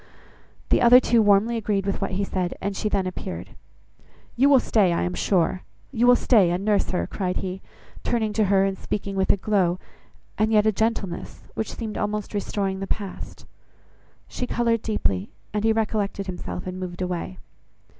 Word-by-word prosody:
The - - +3
other 245 +1 +8
two 235 -2 +3
warmly 210 +3 +3
agreed 200 -3 -1
with 195 - -2
what - - -2
he 195 +2 0
said, 185 -2 -2
and 200 0 -3
she 215 - -1
then 195 -2 0
appeared. 185 +1 -6 0.8
"You 270 +4 +4
will 275 -2 +7
stay, 205 -7 +2
I 170 - 0
am 180 - -2
sure; 185 -1 +1 0.3
you 245 -2 +2
will 245 - +8
stay 215 -8 +4
and 180 +3 -2
nurse 210 -2 +2
her;" 180 - -1
cried 185 -2 -3
he, 190 0 -4 0.4
turning 220 -3 0
to 215 0 +2
her 195 0 +3
and 195 -1 -1
speaking 200 0 -4
with 190 -1 0
a - - +2
glow, 185 -3 +1 0.6
and 215 +1 +2
yet 210 -1 +4
a 215 - +4
gentleness, 215 -4 -2
which 220 - -4
seemed 220 -3 -5
almost 210 0 -3
restoring 195 -1 -2
the 195 - -4
past. 200 -2 -6 0.8
She 250 - -4
coloured 230 -2 +1
deeply, 100 - -1 0.2
and 210 0 -1
he 225 - +4
recollected 210 -3 -1
himself 180 -1 -6
and 185 0 -5
moved 185 0 -5
away. 180 +1 -4
200 Hz, 185 wpm, -24 LUFS, 185-220 Hz, 0.8 s, other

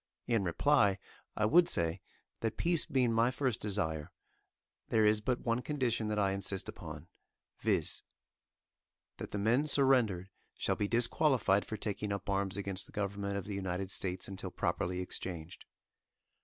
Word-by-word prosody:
In 115 -4 +1
reply, 100 - +3 0.4
I 105 - +1
would 170 +10 +6
say, 85 +2 +1 0.4
that 115 - -2
peace 170 -2 +1
being 125 -4 +2
my 115 +2 +4
first 130 -3 -1
desire, 80 -8 -1 0.8
there 110 -1 +4
is 105 0 +4
but 125 +3 -1
one 115 +1 0
condition 125 -6 -1
that 105 0 -1
I 100 -2 +2
insist 95 0 -1
upon, - - -8 0.5
viz: - - +1 1.2
That - - -6
the - - -4
men 120 +9 +2
surrendered 125 -10 +3 0.3
shall - - 0
be 105 - -1
disqualified 120 -3 +3
for 110 - -4
taking 105 0 -3
up 100 0 -3
arms 100 0 0
against 100 -1 -4
the - - -17
government 100 -1 -2
of 100 - -4
the 105 - -5
United 95 0 -3
States 90 -1 -1
until 95 -1 -5
properly 90 0 -1
exchanged. 85 -3 -5
105 Hz, 155 wpm, -33 LUFS, 95-120 Hz, 1.2 s, would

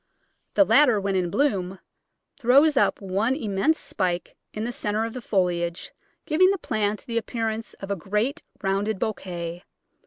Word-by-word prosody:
The 300 - +7
latter, 265 -8 +5
when 195 0 -1
in 180 -2 +1
bloom, 190 -6 0 0.6
throws 280 +6 +5
up 275 - +2
one 200 +6 0
immense 225 +5 +1
spike 180 -2 -2 0.2
in 215 - -4
the 240 - -2
centre 220 -4 -1
of 225 - -5
the 255 - -6
foliage, 175 -5 -1 0.3
giving 350 +4 +4
the 395 - +1
plant 215 - -2
the 230 -1 0
appearance 225 -1 -4
of 195 0 -7
a - - +1
great 210 - -1 0.2
rounded 195 +2 0
bouquet. 175 -4 -4
210 Hz, 155 wpm, -25 LUFS, 190-245 Hz, 0.6 s, The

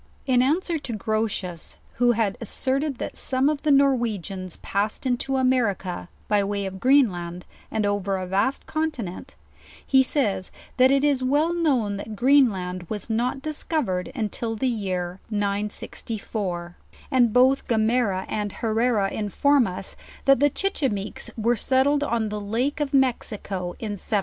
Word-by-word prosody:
In 250 -2 +4
answer 320 +5 +1
to 265 -4 -6
Grotius, 210 -5 -3 0.2
who 245 0 +4
had 220 -3 0
asserted 270 +5 -1
that - - -5
soma 265 +3 +2
of 295 -2 -4
the 305 - 0
Norwenians 225 - +1
passed 205 +5 -2
into 265 +1 0
America 225 -9 0 0.2
by 205 -1 +3
way 200 0 -2
of 190 0 -6
Green* 265 -2 +5
land, 175 0 -6 0.2
and 220 -1 -1
over 200 -1 0
a 185 - -3
vast 200 +9 0
continent, 275 - -4 0.5
he 265 -1 +5
says, 235 -9 0 0.3
that 255 0 +6
it 275 +1 +3
is 285 -3 +2
well 290 +6 +2
known 260 -12 +1
that 215 +2 -6
Greenland 200 - +2
was 215 +1 -4
not 250 +4 -1
discovered 300 - -2 0.2
till 225 -1 -3
the 260 +4 0
year 185 -6 -2
964; 205 -3 -3 0.3
and 245 -4 +4
both 260 +3 +4
Gomera 220 -4 +1
and 210 -2 -3
Herrera 225 -2 +1
inform 250 +6 +2
us, 185 +1 -6 0.3
that 275 -2 +5
the 290 +1 +5
Chichime 265 - -1
ques - - -7
were 230 +2 +2
settled 270 +5 +2
on 230 -5 0
the 210 0 -4
lake 240 +9 -1
of 290 -2 -1
Mexico 210 -9 -1
in 210 -3 -4
721. 205 +2 -1
225 Hz, 150 wpm, -24 LUFS, 200-270 Hz, 0.5 s, that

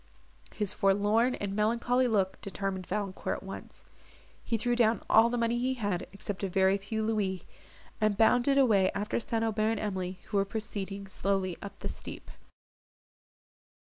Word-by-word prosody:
His 210 -2 -1
forlorn 205 +5 +3
and 200 -1 -4
melancholy 235 +4 +2
look 195 -5 0
determined 195 -2 -4
Valancourt 195 -1 -2
at - - -12
once; 195 0 -9 0.6
he 230 - 0
threw 240 +2 0
down 230 -1 +2
all 225 +2 +6
the 245 - -1
money 235 0 +1
he 260 +2 0
had, 205 -7 -2
except 200 0 -4
a 195 - 0
very 190 +1 +3
few 220 +2 -3
louis, 200 -5 -1 0.6
and 215 -2 +2
bounded 245 +5 +4
away 210 -8 +5
after 210 +3 -1
St. 225 0 -1
Aubert 220 0 +1
and - - -3
Emily, 185 -3 -3
who 205 - 0
were 195 - +4
proceeding 200 -1 -5
slowly 195 -2 -1
up 200 - -8
the - - -3
steep. - - -8
210 Hz, 160 wpm, -30 LUFS, 195-225 Hz, 0.6 s, all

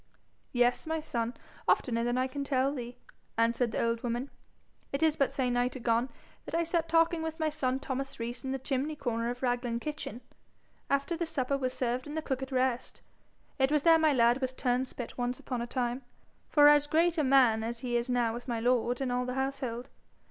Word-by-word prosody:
'Yes, 245 +3 +2
my 320 0 0
son 235 -6 -3 0.3
oftener 230 -2 +2
than 240 +1 0
I 255 - +2
can 280 +2 -4
tell 275 0 +1
thee,' 245 -2 -6 0.4
answered 230 +1 +2
the - - 0
old 230 0 0
woman. 240 +3 -3 0.6
'It 275 +3 -1
is 315 -2 +4
but 275 - +3
a - - -16
se'night 250 -2 0
agone 240 0 +1 0.4
that - - -4
I 335 - +2
sat 330 0 0
a - - -20
talking 330 0 +3
with 320 0 -4
my 315 -1 +1
son 265 -4 0
Thomas 270 -1 -4
Rees 235 +3 -4
in 265 - -3
the 270 - -1
chimney 270 +3 -2
corner 235 -4 -2
of 245 +2 -5
Raglan 245 -1 0
kitchen, 295 -4 -5 0.7
after 280 +4 +1
the 340 0 -2
supper 275 -3 0
was 255 -2 -2
served 250 +2 -1
and 295 +2 -5
the 315 - -2
cook 265 -3 -2
at 265 +1 -5
rest. 255 -1 -1 0.6
It 265 +1 +3
was 300 -2 +2
there 330 -1 +6
my 315 -1 +4
lad 240 0 +3
was 260 0 -1
turnspit 250 -1 -2
once 245 +1 -1
upon 250 -2 -4
a 235 - -3
time, 245 +1 -2 0.5
for 290 -1 +7
as 295 0 +6
great 330 +2 +2
a - - +3
man 255 -5 +4
as 230 +1 -4
he 245 -2 -2
is 235 +1 0
now 240 -2 +1
with 240 +2 -7
my 235 -2 -1
lord 245 +1 +1
and 260 -2 -1
all 250 0 0
the 250 - -3
household. 265 -2 -3
255 Hz, 215 wpm, -30 LUFS, 240-280 Hz, 0.7 s, for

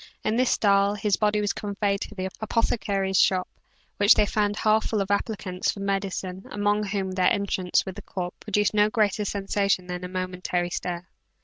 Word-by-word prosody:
In 215 - 0
this 255 +1 +2
style 200 0 +3
his 205 -1 +1
body 210 -1 +1
was 205 - 0
conveyed 200 -1 -2
to 210 - -6
the 190 -1 -3
apothecary's 200 -3 0
shop 185 -1 +3 0.5
which 205 +2 +6
they - - +4
found 205 0 0
half 215 0 +2
full 215 - -1
of 195 0 -1
applicants 200 -3 -1
for - - -10
medicine, 195 -1 -3
among 205 +1 0
whom 195 -2 -2
their 185 -1 +2
entrance 190 -3 +1
with 190 - -5
the 205 - -9
corpse 180 -2 -5
produced 210 0 0
no 210 0 +4
greater 210 -2 +1
sensation 200 -1 0
than 180 0 -5
a - - -3
momentary 180 -1 -2
stare. 175 0 -4
200 Hz, 185 wpm, -25 LUFS, 185-210 Hz, 0.5 s, which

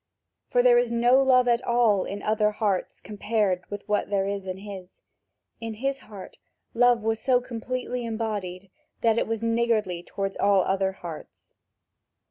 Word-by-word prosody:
For 245 - +3
there 240 -1 +6
is 240 -1 -1
no 240 +3 +4
love 255 -2 +4
at 240 0 +2
all 235 -5 +2
in 200 +1 -6
other 215 0 +2
hearts 210 -3 -2
compared 210 -3 -1
with 205 0 -7
what 210 -1 0
there 195 -1 +1
is 200 -1 -4
in 185 0 -4
his; 195 -2 -10 0.6
in 225 -1 -5
his 270 +4 -2
heart 205 -6 -12 0.3
love 240 -1 +3
was 225 0 0
so 255 0 +3
completely 250 +1 -4
embodied 205 -5 -4 0.3
that 225 0 +3
it - - -1
was 225 0 -3
niggardly 230 -6 0
toward 195 +2 -4
all 200 -1 +4
other 190 0 0
hearts. 170 -4 -10
215 Hz, 160 wpm, -26 LUFS, 195-235 Hz, 0.6 s, there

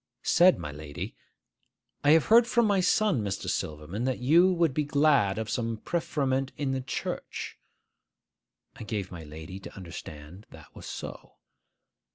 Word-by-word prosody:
Said 180 +1 +5
my 75 - -6
lady, 75 0 -7 0.9
'I 145 - +4
have 160 -2 +4
heard 230 +1 +6
from 235 -1 +3
my 200 -2 +3
son, 185 - +2
Mr. 100 -2 -3
Silverman, 80 +8 -3
that 130 -1 0
you 165 +9 +5
would 170 -5 +2
be 150 - +1
glad 140 -9 +3
of 110 -1 -3
some 115 -1 -2
preferment 135 -3 -1
in 140 -2 -1
the 135 0 -1
church.' 130 - -5 1.2
I - - -8
gave 105 -3 -4
my 85 -2 -8
lady 80 +5 -9
to - - -11
understand 85 0 -10
that - - -15
was - - -10
so. - - -8
130 Hz, 155 wpm, -28 LUFS, -, 1.2 s, heard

